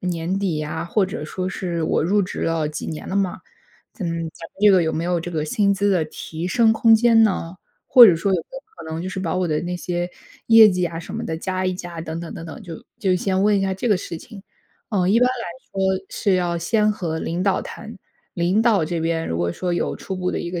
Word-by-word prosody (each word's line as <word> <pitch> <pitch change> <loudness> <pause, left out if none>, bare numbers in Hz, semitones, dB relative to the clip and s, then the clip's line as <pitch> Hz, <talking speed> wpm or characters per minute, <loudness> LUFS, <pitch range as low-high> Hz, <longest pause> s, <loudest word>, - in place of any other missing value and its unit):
年 180 +1 -2
底 185 -6 -1
呀， 155 +2 -4
“或 190 +3 +1
者 170 -4 -6
说 185 +4 -4
是：” 175 -3 -3
我 - - +1
入 195 +6 +2
职 185 - -5
了 165 -2 0
几 150 - -6
年 155 - -6
了 190 - -4
嘛， 195 -2 -1 0.5
咱 205 - -6
们 165 - -2
咱 165 0 -7
们 - - -60
这 210 - +7
个 185 -3 +5
有 160 - 0
没 160 - -2
有 175 -1 0
这 175 - -6
个 155 -3 -2
薪 200 +6 +2
资 200 +1 +1
的 180 -5 +2
提 160 +2 -6
升 225 +2 +4
空 225 +1 +5
间 225 0 +5
呢？ 185 -4 0 0.3
“或 245 - +9
者 175 - +5
说：” 190 +4 0
有 - - +1
没 - - -18
有 - - -8
可 - - -10
能， 165 - -4
就 185 - -4
是 190 0 -4
把 170 -4 -2
我 185 -1 0
的 150 -1 0
那 175 +1 -3
些 175 0 -3 0.4
业 225 -1 +8
绩 180 -2 0
啊 165 -1 -6
什 170 - -8
么 - - -4
的， 160 - -3
加 185 +2 -3
一 185 - +1
加。” 175 -2 -7
等 160 0 -5
等 170 - -7
等 165 - -7
等， 160 -3 -9
就 170 -5 -9
就 190 -2 +1
先 190 +1 0
问 210 0 +4
一 195 - +1
下 190 0 0
这 195 +6 -2
个 205 - +4
事 170 -2 -6
情。 200 +3 -12 0.5
嗯， 185 -4 +1
一 230 - +4
般 250 - +5
来 250 -2 -4 0.3
说， 190 0 0
是 200 - 0
要 175 -2 0
先 210 +5 +2
和 170 -6 -3
领 170 +2 -2
导 195 -2 +1
谈， 220 +1 -9 0.4
领 175 +4 +1
导 225 -7 +3
这 170 +2 -3
边， 165 0 -1
如 80 - -2
果 85 0 0
说 180 - -3
有 175 - -1
初 190 - -6
步 180 0 -1
的 - - -2
一 170 - -5
个 175 -1 -3
180 Hz, 285 characters per minute, -22 LUFS, 165-200 Hz, 0.5 s, 或